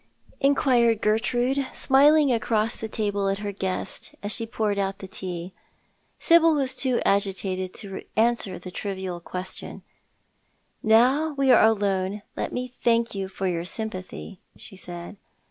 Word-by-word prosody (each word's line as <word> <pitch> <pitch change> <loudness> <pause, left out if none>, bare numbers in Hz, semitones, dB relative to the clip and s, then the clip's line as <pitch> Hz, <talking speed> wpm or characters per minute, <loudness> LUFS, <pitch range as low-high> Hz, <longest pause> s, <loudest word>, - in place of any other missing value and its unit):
inquired 250 -5 +3
Gertrude, 245 +5 +1
smiling 285 +1 +5
across 225 -1 0
the 220 - -6
table 205 -2 -1
at 195 - 0
her 205 0 -4
guest, 190 -2 -4
as 205 - -2
she 230 0 0
poured 215 -3 -1
out 195 0 -1
the 195 - -9
tea. 185 -2 -6 0.6
Sibyl 330 -2 +5
was 270 -3 -1
too 255 -1 +1
agitated 190 -2 0
to 195 -2 -6 0.2
answer 225 -4 +1
the 185 - -9
trivial 190 -2 -5
qiiestion. 180 +2 -7 0.5
" - - -44 0.2
Now 285 +7 +3
we 275 -2 +3
are 245 - +7
alone 200 -2 +1
let - - -3
me 250 0 -3
thank 235 -2 0
you 195 -1 -3
for 190 0 -3
your 170 -2 -1
sympathy," 185 -1 -5 0.2
she - - -9
said. 175 +1 -8
210 Hz, 145 wpm, -25 LUFS, 190-245 Hz, 0.6 s, are